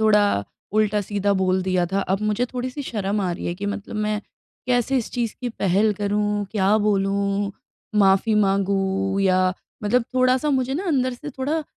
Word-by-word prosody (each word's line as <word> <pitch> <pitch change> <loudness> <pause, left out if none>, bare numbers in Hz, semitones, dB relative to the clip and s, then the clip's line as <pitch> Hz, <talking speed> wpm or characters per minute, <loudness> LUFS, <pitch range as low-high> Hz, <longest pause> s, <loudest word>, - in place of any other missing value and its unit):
थोड़ा 215 -1 +5 0.5
उल्टा-सीधा 205 -1 +1
बोल 185 0 +2
दिया 185 -1 +1
था। 195 - +2
अब 195 0 -1
मुझे 215 +3 +1
थोड़ी-सी 255 +3 -4
शर्म 210 -5 -2
आ 185 -2 0
रही 170 - -5
है 175 - -2
कि 200 +3 -5
मतलब 205 +1 -4
मैं 210 0 -1 0.5
कैसे 250 +1 +2
इस 235 - -4
चीज़ 235 -3 -2
की 250 - -2
पहल 210 -1 +1
करूँ? 205 0 0
क्या 205 0 +3
बोलूँ? 200 -1 0 0.5
माफ़ी 195 +2 +4
माँगूँ? 195 -1 +1
या 185 -1 +3 0.3
मतलब 230 +4 +2
थोड़ा-सा 255 +3 +3
मुझे 265 -1 0
ना 355 +7 -2
अंदर 255 -6 +1
से 295 +4 -8
थोड़ा 290 +4 -2
210 Hz, 170 wpm, -23 LUFS, 195-245 Hz, 0.5 s, थोड़ा